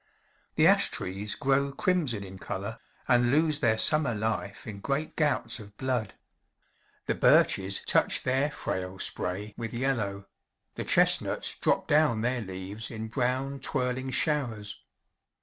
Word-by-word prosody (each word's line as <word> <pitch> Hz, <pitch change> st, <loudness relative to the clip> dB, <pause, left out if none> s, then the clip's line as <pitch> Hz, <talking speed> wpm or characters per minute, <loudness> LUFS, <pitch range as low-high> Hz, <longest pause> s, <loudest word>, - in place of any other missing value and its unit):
The -, -, +4 dB
ash -, -, +5 dB
trees 100 Hz, +3 st, -3 dB
grow 140 Hz, 0 st, +1 dB
crimson 140 Hz, -, -1 dB
in 95 Hz, -1 st, -10 dB
color, 100 Hz, +5 st, -5 dB, 0.3 s
and 120 Hz, -1 st, +3 dB
lose 155 Hz, +2 st, +2 dB
their 110 Hz, -4 st, +2 dB
summer 150 Hz, -3 st, +3 dB
life 105 Hz, -2 st, -3 dB
in 105 Hz, -3 st, -7 dB
great 140 Hz, +8 st, -3 dB
gouts 150 Hz, -5 st, 0 dB
of 100 Hz, -1 st, -13 dB
blood. 125 Hz, -6 st, -2 dB, 0.9 s
The -, -, 0 dB
birches 95 Hz, 0 st, +3 dB
touch -, -, +3 dB
their 130 Hz, +3 st, +1 dB
frail 95 Hz, -9 st, -4 dB
spray 100 Hz, +3 st, -3 dB
with 115 Hz, -1 st, -5 dB
yellow; 115 Hz, -6 st, -2 dB, 0.5 s
the -, -, -5 dB
chestnuts -, -, +4 dB
drop -, -, 0 dB
down 145 Hz, -7 st, +3 dB
their 120 Hz, +1 st, -1 dB
leaves 95 Hz, +2 st, -5 dB
in 110 Hz, -1 st, -6 dB
brown, 130 Hz, +3 st, -2 dB
twirling 130 Hz, 0 st, -1 dB
showers. 120 Hz, -7 st, -1 dB
120 Hz, 135 wpm, -28 LUFS, 105-135 Hz, 0.9 s, ash